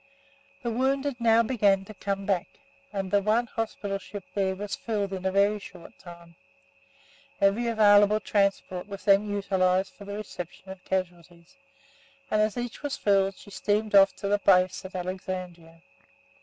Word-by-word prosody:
The 235 - -1
wounded 270 +2 0
now 230 0 +5
began 200 -5 +2
to 215 - -10
come 195 0 -3
back, 190 -3 0 0.4
and 195 -2 -4
the 205 - +3
one 220 +4 +2
hospital 215 -4 -4
ship 200 0 -9
there 190 -2 0
was 205 +1 -4
filled 205 -4 -3
in 190 0 -3
a - - 0
very 200 +2 +2
short 180 -3 -13
time. 170 -1 -13 1.1
Every 200 +5 +2
available 210 -2 +5
transport 200 -3 -1
was 200 -2 -8
then 200 +1 +4
utilised 190 -2 +1
for 200 - -13
the 200 +1 -6
reception 190 -2 -8
of 190 -1 -11
casualties, 175 +1 -5 0.8
and 215 - +3
as 215 +2 0
each 245 -1 -5
was 290 -2 -3
filled 195 -1 +2
she 205 - -15
steamed 210 +2 -1
off 195 -1 +6
to 200 - -5
the 205 +1 +2
base 185 -1 +3
at 190 - -9
Alexandria. 180 -2 -6
200 Hz, 160 wpm, -27 LUFS, 185-215 Hz, 1.1 s, off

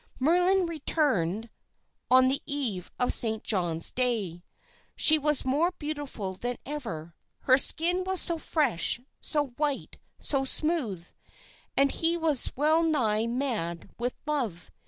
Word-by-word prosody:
"Merlin 360 +6 +2
returned 235 - -1 0.6
on 255 0 +5
the 270 +2 0
eve 250 - -4
of 250 - +3
Saint 220 -2 +4
John's 175 -5 +2
Day. 215 -9 -2 0.5
She 315 0 +6
was 300 -2 +1
more 290 +7 +1
beautiful 290 -10 -5
than 245 +6 -4
ever. 225 - -7 0.3
'Her 260 0 +4
skin 350 +6 +4
was 375 0 0
so 335 -1 +4
fresh, 265 - 0 0.2
so 295 -2 -2
white, 290 -2 -3 0.2
so 275 -2 -1
smooth!' 265 - -1 0.7
And 275 0 +3
he 335 +1 0
was 315 -6 +1
well 310 +4 +2
nigh 230 -9 0
mad 230 - -4
with 245 +1 -3
love. 245 - -3
270 Hz, 130 wpm, -27 LUFS, 220-310 Hz, 0.7 s, She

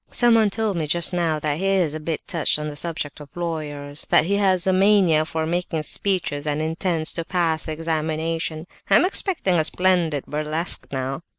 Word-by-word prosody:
"Someone 230 -3 +4
told 210 -2 -1
me 155 -2 -2
just 170 +4 +1
now 170 -3 0
that 150 0 -2
he 195 - -1
is 185 -6 +2
a 155 - -4
bit 155 0 -4
touched 165 -4 +1
on 150 0 -4
the 150 - -6
subject 155 -2 -3
of 145 -1 -11
lawyers, 150 -4 -5
that - - +4
he 200 +3 +1
has 190 -3 +2
a 190 - +2
mania 185 -5 +4
for 160 0 -3
making 165 -1 -2
speeches 155 -5 -2
and 150 0 -1
intends 160 +1 0
to 165 - -2
pass 165 -2 +1
the 155 - -3
examinations. 160 0 -3 0.2
I 195 - +5
am 225 - +5
expecting 355 - +2
a - - +3
splendid 165 -2 +1
burlesque 155 +3 -2
now." 135 +2 -3
165 Hz, 195 wpm, -22 LUFS, 155-185 Hz, 0.2 s, I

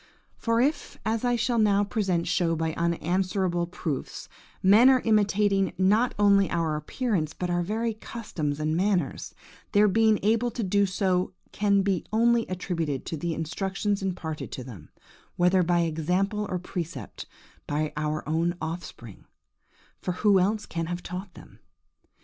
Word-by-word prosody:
For 230 0 0
if, 285 +6 0
as 220 +1 0
I 245 -1 +2
shall 235 0 0 0.3
presently 190 -6 0
show 165 -2 +1
by 160 0 -1
unanswerable 175 +1 0
proofs, 160 -5 -5 0.4
men 210 +7 +7
are 260 -2 +4
imitating 205 -2 +2
not 210 +6 +3
only 200 -1 +4
our 165 -2 0
appearance, 155 - -2
but 180 -1 -3
our 175 0 +1
very 220 +5 -1
customs 175 -10 -4
and 155 +1 0
manners, 185 -5 -1 0.4
their 210 +1 +5
being 220 +1 +4
able 230 +3 +2
to 235 0 -4
do 200 +1 +2
so 185 -1 0 0.2
can 200 -1 +2 0.3
only 235 +1 +3
be - - -13
attributed 165 -7 -3
to - - -4
the 165 +1 -3
instructions 195 +5 -2
imparted 175 -5 -4
to 130 - -5
them, 105 - -11 0.5
whether 180 +1 +3
by 175 0 +2
example 180 +6 0
or 185 - -1
precept, 170 - -6 0.4
by 150 +1 -1
our 150 0 -2
own 165 +3 0
offspring,–for 160 - -9
who 200 +1 +4
else 205 +3 0
can 165 -1 -4
have 175 +1 -4
taught 180 +2 -7
them? - - -15
185 Hz, 145 wpm, -26 LUFS, 165-210 Hz, 0.5 s, men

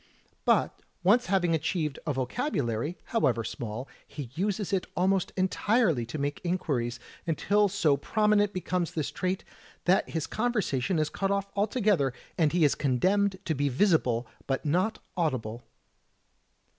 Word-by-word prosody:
But, - - +2 0.2
once 220 +7 +4
having 180 -3 +2
achieved 155 -2 -1
a 150 - +1
vocabulary, 135 - -1
however 130 - +1
small, 115 +4 -5 0.2
he 140 -6 -7
uses 200 +4 -1
it 190 -2 0
almost 190 +1 +2
entirely 185 - +2
to 140 - -5
make 145 0 -2
inquiries, 135 -9 -1 0.3
until 205 +6 +3
so 165 -7 +2
prominent 210 +5 +2
becomes 180 -2 -2
this 155 -3 -1
trait, 185 +1 -2 0.4
that 185 +2 +3
his 160 -2 -2
conversation 200 - 0
is 155 -1 +1
cut 195 - -1
off 200 0 -1
altogether, 200 - +2 0.2
and 155 -3 +3
he 175 -1 +2
is 145 - +5
condemned 185 +9 +1
to 160 - +1
be 145 0 0
visible 130 - +2 0.2
but 135 +2 -1
not 185 +9 +1 0.2
audible. 125 -9 -1
175 Hz, 140 wpm, -28 LUFS, 140-200 Hz, 0.4 s, is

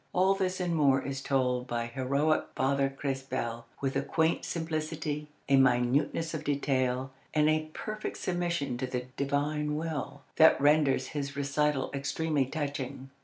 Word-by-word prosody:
All 190 +2 +4
this 185 -1 -1
and 175 -2 0
more 140 -3 +4
is 135 0 -4
told 125 -2 0
by 120 -1 -1
heroic 140 +5 +1
Father 135 +1 +2
Crespel 135 -4 -3
with 135 -1 -1
a - - +2
quaint 160 +1 +1
simplicity, 155 -2 -3 0.2
a 140 - +5
minuteness 135 +5 +2
of 155 -1 -4
detail, 130 -3 0 0.2
and 150 0 +4
a 155 0 +1
perfect 215 0 -5
submission 175 -8 -1
to 130 - -1
the 125 -1 -3
Divine 150 +2 0
will, 145 -3 -4
that 160 0 +7
renders 145 -3 +3
his 140 -2 -4
recital 140 0 0
extremely 140 0 0
touching. 140 -2 -4
140 Hz, 145 wpm, -30 LUFS, 135-155 Hz, 0.2 s, that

